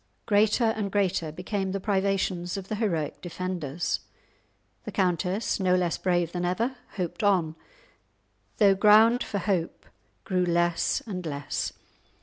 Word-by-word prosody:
Greater 210 +2 +3
and 220 -3 0
greater 185 -6 0
became 190 +3 -3
the 195 - -1
privations 190 -2 0
of 195 -1 -7
the 215 - -1
heroic 170 -9 -1
defenders. 175 -3 -3 0.8
The - - -6
countess, 185 +3 0
no 185 -1 +3
less 175 -3 0
brave 175 -2 +1
than 175 0 -3
ever, 225 +9 0 0.2
hoped 180 +2 -3
on, 180 -6 +2 1.0
though 200 -2 +6
ground 215 +4 +6
for 205 - -4
hope 185 -3 -2 0.4
grew 185 -1 0
less 175 -1 +1
and 185 -5 -5
less. 145 -3 -3
185 Hz, 135 wpm, -27 LUFS, 175-205 Hz, 1.0 s, though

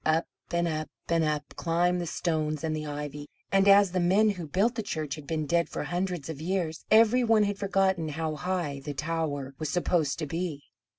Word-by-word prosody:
Up, 160 +1 +2 0.2
and 170 0 +1
up, 155 -1 -2 0.2
and 165 -1 +3
up 150 -1 0
climbed 175 +1 +1
the 175 - -3
stones 155 -3 -1
and 160 -1 -1
the 155 0 -4
ivy; 145 0 -5 0.2
and 195 0 +4
as 200 -1 +7
the 185 - 0
men 195 +5 +4
who 180 -5 -6
built 200 +10 +2
the 230 - -2
church 155 -8 -3
had 145 -1 -9
been 155 -1 -1
dead 170 +3 +1
for - - -4
hundreds 175 -4 -2
of 155 -2 -6
years, 170 -2 -2
every 230 +3 +5
one 225 -2 +4
had 205 -1 -1
forgotten 190 -4 +1
how 155 +1 -2
high 165 -3 -2
the 145 0 -5
tower 150 -3 -2
was 155 - -2
supposed 165 -2 +1
to 155 - -3
be. 160 -1 -4
165 Hz, 210 wpm, -28 LUFS, 155-185 Hz, 0.2 s, as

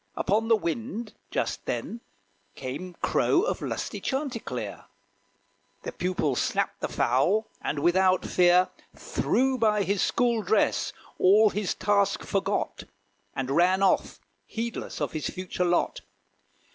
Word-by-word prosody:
Upon 220 +3 +1
the 225 - +6
wind, 220 +4 -4 0.2
Just - - -2
then, 230 - -3 0.5
came 165 +8 -6
crow 355 - +3
of 485 - -1
lusty - - -4
chanticleer: 265 -4 -4 1.0
The - - -4
pupil 180 -7 -1
snapped - - -1
the - - 0
fowl, 175 - +2 0.2
and - - -2
without 185 +4 +3
fear, 180 0 +4 0.3
Threw 260 +1 0
by 210 -2 +3
his 195 +1 0
school 240 -2 +2
dress, 210 +2 +1 0.3
all 210 +3 +6
his 205 -2 -2
task 200 -1 +1
forgot, 195 +1 -2 0.5
And 135 0 -2
ran 180 +5 +3
off, 195 - +2 0.3
heedless 230 +1 -5
of - - -1
his 155 -2 -3
future 180 0 -3
lot. 175 0 +1
195 Hz, 125 wpm, -27 LUFS, 180-225 Hz, 1.0 s, the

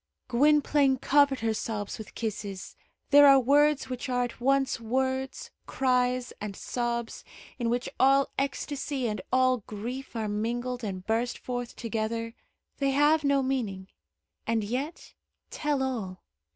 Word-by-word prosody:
Gwynplaine 285 +1 +3
covered 280 0 +3
her 225 -1 +1
sobs 215 -1 -4
with 215 - -10
kisses. 205 -4 -5 0.4
There 290 0 +9
are 275 -1 +8
words 290 +3 +3
which 255 +1 -5
are 245 -1 +1
at 245 0 -6
once 270 0 +2
words, 260 +3 -2 0.2
cries, 250 -1 +1
and 205 -1 -5
sobs, 235 0 -3 0.4
in 235 -1 0
which 245 +1 -1
all 275 +1 +4
ecstasy 275 -1 -2
and 210 -3 -3
all 255 0 +4
grief 240 +6 -6
are 220 -2 -2
mingled 240 +4 -2
and 190 -3 -5
burst 230 +2 0
forth 245 -1 -5
together. 230 0 -3 0.5
They 275 -1 +2
have 295 +3 +3
no 280 -1 +2
meaning, 215 -8 -2 0.6
and 230 -1 +1
yet 265 - -4 0.4
tell 290 -3 -1
all. 210 -9 -4
250 Hz, 140 wpm, -28 LUFS, 225-270 Hz, 0.6 s, There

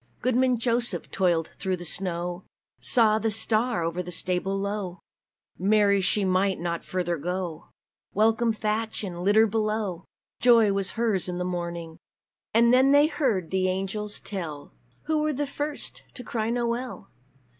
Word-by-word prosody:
Goodman 255 0 +2
Joseph 235 -5 -1
toiled 175 -4 +1
through 190 -2 -1
the 175 - -8
snow 175 0 -3 0.4
Saw 220 -3 +4
the 225 - 0
star 220 -1 +1
o'er 165 +2 -2
a 180 0 -4
stable 185 +3 -1
low; 200 -2 -3 0.6
Mary 200 +1 +4
she 195 +2 +2
might 190 +1 +1
not 170 0 -3
further 175 -2 -2
go 175 +1 -4 0.4
Welcome 225 +2 +3
thatch, 220 0 -2
and 175 -3 -5
litter 210 +3 +5
below! 215 -4 -1 0.3
Joy 230 -4 +5
was 195 -1 -1
hers 215 -6 0
in 175 - -3
the 180 - -2
morning! 170 -2 -4 0.5
And 235 +2 +5
then 260 +2 +5
they 285 +1 +6
heard 235 - 0
the 185 -1 +1
angels 195 +3 -3
tell 165 -8 -6 0.3
"Who 310 0 0
were 305 0 +1
the 290 +2 -1
first 290 +1 -5
to 250 - -7
cry 225 -1 -2
NOWELL? 235 -2 -3
200 Hz, 150 wpm, -26 LUFS, 180-230 Hz, 0.6 s, they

